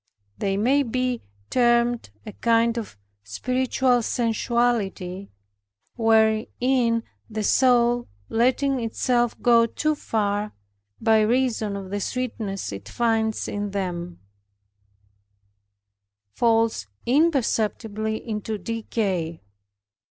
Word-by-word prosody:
They 195 -1 0
may 260 +7 +3
be 255 -1 -1 0.3
termed 240 - +2 0.2
a - - -6
kind 230 +2 +2
of 210 - -8 0.3
spiritual 250 - +1
sensuality, 225 -5 -1 0.7
wherein 230 +2 +2 0.3
the 215 -1 -3
soul 240 0 +3 0.2
letting 260 +3 +1
itself 240 +1 0
go 235 -1 +5
too 310 +6 0
far, 210 -6 -1 0.5
by 220 -1 +4
reason 225 -2 +1
of 195 -1 -7
the 205 - -1
sweetness 220 - -3
it 100 -1 -8
finds 225 -2 0
in 205 0 -3
them, 180 -3 -4 2.1
falls 225 - +2 0.2
imperceptibly 225 -6 0
into 215 0 -3
decay. 195 - -3
225 Hz, 90 wpm, -24 LUFS, 205-245 Hz, 2.1 s, go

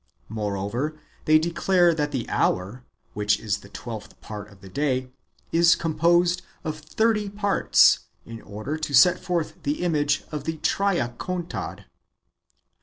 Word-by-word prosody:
Moreover, 110 +8 -3 0.3
they 155 0 +6
declare 170 +2 +3
that 150 -2 -1
the 130 -5 -3
hour, 100 +8 0 0.3
which 105 0 +1
is 105 -3 -2
the 100 - -15
twelfth 110 +1 -8
part 105 -1 -8
of 95 -2 -18
the 95 - -12
day, 130 +1 -1 0.4
is 170 0 +5
com 165 -1 -2
posed" 175 +2 +3 0.2
of 155 -2 -4
thirty 210 +6 0
parts, 205 0 +4 0.3
in 115 0 -9
order 110 +9 -5
to 155 -3 -2
set 180 +8 +6
forth 175 -4 -3
the 145 +4 -2
image 145 -4 +1
of 150 -2 -5
the 160 0 -2
Triacontad. 175 0 -2
150 Hz, 140 wpm, -25 LUFS, 115-170 Hz, 0.4 s, they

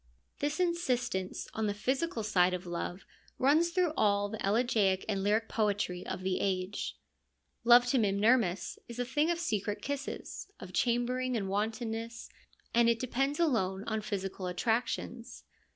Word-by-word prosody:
This 295 +3 -1
insistence 250 - -1
on 220 -1 -1
the 205 - -1
physical 260 +3 -1
side 185 -3 +3
of 180 +1 -7
love 175 +1 -4 0.3
runs 300 +6 +4
through 345 -2 +1
all 205 -3 +2
the 220 0 -5
elegiac 205 -3 +2
and 200 -3 0
lyric 215 +3 +2
poetry 205 -4 0
of 185 0 -4
the 185 -1 0
age. 190 0 -2 0.7
Love 240 +1 +7
to 255 +1 +2
Mimnermus 205 -1 +2
is 235 0 -8
a 245 - -1
thing 295 +6 +1
of 345 - +1
secret 210 - -2
kisses, 280 0 -5
of 185 0 -9
chambering 245 +2 +1
and 200 -3 -2
wantonness, 225 +3 -3 0.4
and 235 0 +5
it 230 - +3
depends 270 +4 -1
alone 200 - +1
on 220 -1 -1
physical 195 -2 -4
attractions. 230 +4 -2
225 Hz, 150 wpm, -31 LUFS, 195-255 Hz, 0.7 s, Love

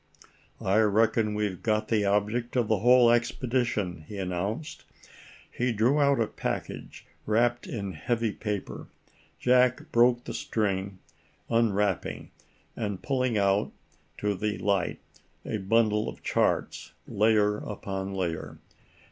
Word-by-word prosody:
"I 95 +3 +3
reckon 110 0 +2
we've 105 -4 -2
got 110 -1 0
the 105 -3 +2
object 105 +5 0
of 120 -3 +2
the 110 -2 +2
whole 120 +1 +6
expedition," 120 - 0
he 105 - -8
announced. 100 - -4 0.7
He 125 0 0
drew 120 +7 +2
out 140 -2 +3
a 115 - +3
package - - -5 0.2
wrapped 120 +3 +1
in 100 -4 -4
heavy 115 +7 -1
paper. 105 -2 -5 0.5
Jack 125 0 +2
broke 120 +1 +4
the - - -6
string, 100 -3 -2 0.5
unwrapping, 105 -4 0 0.4
and 105 -5 -4
pulling 130 -4 0
out 100 0 +1 0.4
to 105 0 0
the 105 +2 -2
light, 100 -4 -1 0.4
a - - -2
bundle 105 +1 +2
of - - -11
charts, - - 0
layer 105 0 +2
upon 95 -2 -5
layer. 85 -4 -3
105 Hz, 120 wpm, -27 LUFS, 100-120 Hz, 0.7 s, whole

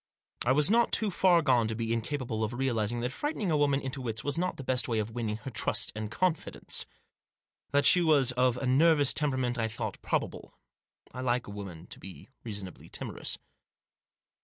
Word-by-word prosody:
I 120 - +3
was 150 +7 +4
not 235 +1 +4
too 215 -2 +3
far 175 -2 +4
gone 125 -6 +3
to 110 - -2
be 115 0 -1
incapable 115 -1 -2
of 110 +2 -2
realising 120 -3 -1
that 125 +1 -2
frightening 230 - -2
a - - +3
woman 145 -2 +2
into 135 -1 -5
fits 110 -3 -3
was 145 -1 -1
not 180 +2 -1
the 135 - -6
best 130 -1 0
way 115 -2 0
of 110 +1 -2
winning 110 -2 -3
her 135 +3 -8
trust 110 0 0
and 110 0 -4
confidence. 170 +6 -1 0.8
That 145 0 +2
she 180 - +7
was 145 -6 +4
of 125 -1 +2
a 130 - -3
nervous 145 +2 +4
temperament 130 -5 0
I 115 - +1
thought 110 0 -5
probable. - - -3 0.6
I 125 - -5
like 125 -1 0
a - - -9
woman 95 -5 -8
to - - -10
be 95 +5 -11
reasonably 100 -5 -7
timorous. - - -3
125 Hz, 190 wpm, -29 LUFS, 115-145 Hz, 0.8 s, she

